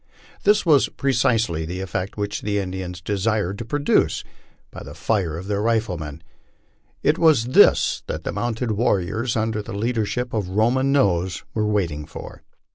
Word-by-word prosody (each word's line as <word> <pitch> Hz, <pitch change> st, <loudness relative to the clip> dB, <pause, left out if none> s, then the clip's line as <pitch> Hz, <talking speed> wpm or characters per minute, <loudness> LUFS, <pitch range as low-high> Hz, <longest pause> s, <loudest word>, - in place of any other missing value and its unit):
This 210 Hz, 0 st, +4 dB
was 150 Hz, -5 st, +4 dB
pre 135 Hz, -1 st, -1 dB
cisely 115 Hz, -10 st, +1 dB
the 90 Hz, +3 st, -5 dB
eftect 95 Hz, +1 st, -4 dB
which 105 Hz, 0 st, -3 dB
the 105 Hz, 0 st, -1 dB
Indians 90 Hz, -2 st, -4 dB
desired 100 Hz, 0 st, -1 dB
to 115 Hz, -, -5 dB
produce 145 Hz, +5 st, +1 dB, 0.5 s
by -, -, -9 dB
the -, -, -9 dB
fire 95 Hz, -8 st, -1 dB
of 90 Hz, -, -7 dB
their 100 Hz, 0 st, -1 dB
rifle 110 Hz, -4 st, +1 dB
men. 75 Hz, +1 st, -8 dB, 0.8 s
It 150 Hz, -, +2 dB
was 155 Hz, -9 st, +4 dB
this -, -, +5 dB
that -, -, -4 dB
the -, -, -3 dB
mounted 120 Hz, 0 st, -2 dB
warriors, 110 Hz, +2 st, 0 dB
under 110 Hz, -1 st, -1 dB
the 100 Hz, -, -7 dB
leadership 115 Hz, +2 st, -1 dB
of 105 Hz, -5 st, -2 dB
Roman 120 Hz, +7 st, +2 dB
Nose, 95 Hz, -9 st, +1 dB
were 105 Hz, -1 st, 0 dB
waiting 85 Hz, -8 st, -1 dB
for. -, -, -10 dB
105 Hz, 165 wpm, -22 LUFS, 95-120 Hz, 0.8 s, this